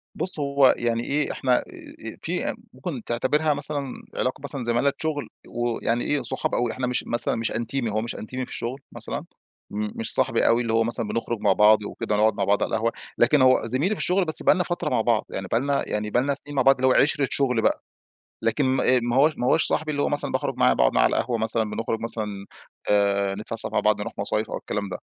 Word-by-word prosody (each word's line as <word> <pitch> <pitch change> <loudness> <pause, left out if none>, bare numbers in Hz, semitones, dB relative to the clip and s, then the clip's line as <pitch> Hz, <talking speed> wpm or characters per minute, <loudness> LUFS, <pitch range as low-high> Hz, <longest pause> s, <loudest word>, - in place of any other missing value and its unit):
بُص، 180 -4 +1
هو 140 -2 +4
يعني 115 -1 -1
إيه، 145 +3 -1
إحنا 125 -2 +1
آآ، - - 0 0.5
آآ - - -18
فيه - - -2 0.2
ممكن - - -6
تعتبرها 150 +6 +1
مثلًا 145 -2 -4 0.2
علاقة 130 - -1
مثلًا 140 -2 -4
زمالة 120 +4 +1
شُغل 155 -3 -3 0.2
و 120 -1 -2
يعني 120 +1 0
إيه، 145 -2 0
صحاب 120 - -3
أوي، 120 -1 0
إحنا 130 -1 -3
مش 125 - -1
مثلًا 120 0 -1
مش 115 0 -2
أنتيمي، 120 +1 -2
هو 110 +1 0
مش 115 - -5
أنتيمي 130 +4 -5
في - - -16
الشغل 130 +4 -5
مثلًا، - - -5 0.5
م 105 +1 -2
مش 115 - +1
صاحبي 130 -3 +2
أوي 115 +1 +4
اللي 115 -2 -1
هو 115 0 +3
مثلًا 115 -1 -1
بنخرُج 115 +1 -2
مع - - +3
بعض 105 0 +5
وكده 105 - -3
نقعد 110 +1 +3
مع 100 - -2
بعض 100 +1 +2
على - - -2
القهوة، 115 +1 0 0.3
لكن 130 +4 +4
هو 130 0 +5
زميلي 140 - 0
في - - -10
الشغل 185 +1 +2
بس 160 - -1
بقى - - +5
لنا 180 - +1
فترة 175 -3 -2
مع - - +1
بعض، 115 -1 +1
يعني 95 -1 -5
بقى 115 - +1
لنا 140 +2 0
يعني 105 0 -2
بقى 125 - +2
لنا 140 +1 0
سِنين 145 +1 -8
مع 135 - +3
بعض 135 +1 +6
اللي 130 +1 +1
هو - - +5
عِشرة 145 -1 +1
شُغل 125 -5 +1
بقى، - - +1 0.6
لكن 115 +5 +1
ما 130 0 +1
آآ، - - +4
ما 120 0 -1
هو 150 +4 +5
ما 125 - -1
هوّاش 160 - +4
صاحبي 155 0 -1
اللي 145 -1 -1
هو - - +1
مثلًا - - 0
باخرُج - - -2
معاه، - - +4
باقعد - - +2
معاه - - +4
على - - +2
القهوة 120 - 0
مثلًا، 110 0 0
بنخرُج 110 +1 -3
مثلًا 105 -4 -4 0.4
آآ 100 -1 +2
نتفسَّح 110 +2 -3
مع - - +1
بعض 105 -1 +2
نروح 115 +3 -5
مصايف 105 +2 -1
أو - - -3
الكلام 100 -1 -4
ده. 90 - -4
120 Hz, 240 wpm, -24 LUFS, 110-140 Hz, 0.6 s, بعض